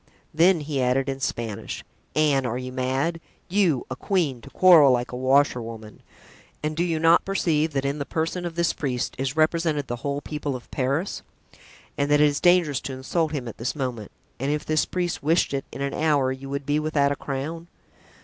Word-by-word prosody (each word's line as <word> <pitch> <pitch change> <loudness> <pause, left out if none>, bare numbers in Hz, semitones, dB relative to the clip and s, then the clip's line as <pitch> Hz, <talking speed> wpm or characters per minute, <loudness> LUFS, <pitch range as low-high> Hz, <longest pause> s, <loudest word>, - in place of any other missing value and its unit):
Then 170 +1 +4
he 145 -2 -2
added 130 +2 +1
in 135 0 -3
Spanish, 115 -5 -4 0.3
"Anne, 145 -3 +3
are 120 -1 -2
you 130 0 -5
mad? 135 +6 -1 0.3
You, 180 -8 +2
a - - -2
queen 150 -7 -1
to - - -12
quarrel 165 -7 +7
like 125 -1 0
a - - -5
washerwoman! 125 -5 0 0.6
And 155 0 -1
do 170 - +1
you 170 -2 0
not 165 +2 +5
perceive 160 -5 0
that 135 0 -1
in 140 +2 -1
the 140 - -2
person 165 +3 -2
of 170 -1 -5
this 170 -1 +1
priest 125 -4 -2
is 135 +1 -2
represented 155 -2 +1
the 120 -1 -4
whole 140 +3 -3
people 150 -2 -4
of 125 - -10
Paris 140 +8 -1 0.8
and 140 0 +1
that 145 0 +4
it 150 - +6
is 145 -1 +1
dangerous 175 -6 +3
to 135 - -5
insult 150 +5 -1
him 135 -6 -4
at 115 - -8
this 120 +6 -2
moment, 125 -7 -4 0.3
and 135 +3 -1
if 150 0 -2
this 155 0 +1
priest 180 -1 -2
wished 160 0 +2
it, 135 -1 -2
in 140 - -7
an 140 0 -2
hour 145 -4 +2
you 135 +1 -7
would 140 0 -4
be 145 +2 +1
without 150 -2 +1
a - - 0
crown? 150 +5 -5
145 Hz, 205 wpm, -24 LUFS, 130-160 Hz, 0.8 s, quarrel